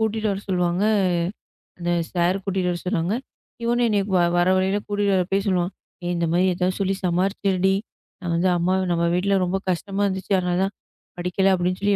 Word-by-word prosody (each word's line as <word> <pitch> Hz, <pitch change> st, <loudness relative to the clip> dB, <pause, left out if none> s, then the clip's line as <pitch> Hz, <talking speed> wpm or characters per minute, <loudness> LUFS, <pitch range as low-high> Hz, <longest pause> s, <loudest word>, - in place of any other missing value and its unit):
கூட்டிட்டு 220 Hz, 0 st, 0 dB
வரச் 195 Hz, +1 st, -7 dB
சொல்லுவாங்க. 180 Hz, +1 st, +1 dB, 0.9 s
அந்தச் 170 Hz, -1 st, -1 dB
சார் 180 Hz, +3 st, +2 dB
கூட்டிட்டு 185 Hz, -2 st, 0 dB
வரச் 175 Hz, +1 st, -5 dB
சொல்லுவாங்க. 180 Hz, +3 st, 0 dB, 0.5 s
இவனும் 240 Hz, +1 st, +2 dB
என்னைய 205 Hz, -2 st, +2 dB
வ -, -, +4 dB, 0.2 s
வர 175 Hz, +1 st, +3 dB
வழியில 190 Hz, +2 st, +1 dB
கூட்டிட்டு 205 Hz, -1 st, +1 dB
வர 185 Hz, -, +3 dB
போய் 195 Hz, +1 st, +1 dB
சொல்லுவான். 180 Hz, -1 st, +1 dB, 0.3 s
"ஏய் 175 Hz, -, -1 dB
இந்த 170 Hz, -, 0 dB
மாதிரி 180 Hz, +2 st, +3 dB
ஏதாவது 180 Hz, +1 st, 0 dB
சொல்லி 195 Hz, 0 st, +1 dB
சமாளிச்சுடுடி. 190 Hz, +1 st, +1 dB, 0.5 s
நான் 175 Hz, -2 st, -2 dB
வந்து 180 Hz, +2 st, +2 dB
அம்மா 175 Hz, +2 st, +1 dB, 0.2 s
நம்ம 170 Hz, 0 st, +1 dB
வீட்ல 195 Hz, +2 st, +2 dB
ரொம்ப 185 Hz, +2 st, 0 dB
கஷ்டமா 195 Hz, +3 st, -2 dB
இருந்துச்சு. 190 Hz, +1 st, -2 dB
அதனால 180 Hz, -1 st, 0 dB
தான் 195 Hz, +1 st, -2 dB, 0.5 s
படிக்கல 180 Hz, +2 st, +2 dB
அப்படின்னு 180 Hz, +1 st, -1 dB
சொல்லி 200 Hz, 0 st, +3 dB
185 Hz, 180 wpm, -23 LUFS, 175-195 Hz, 0.9 s, வ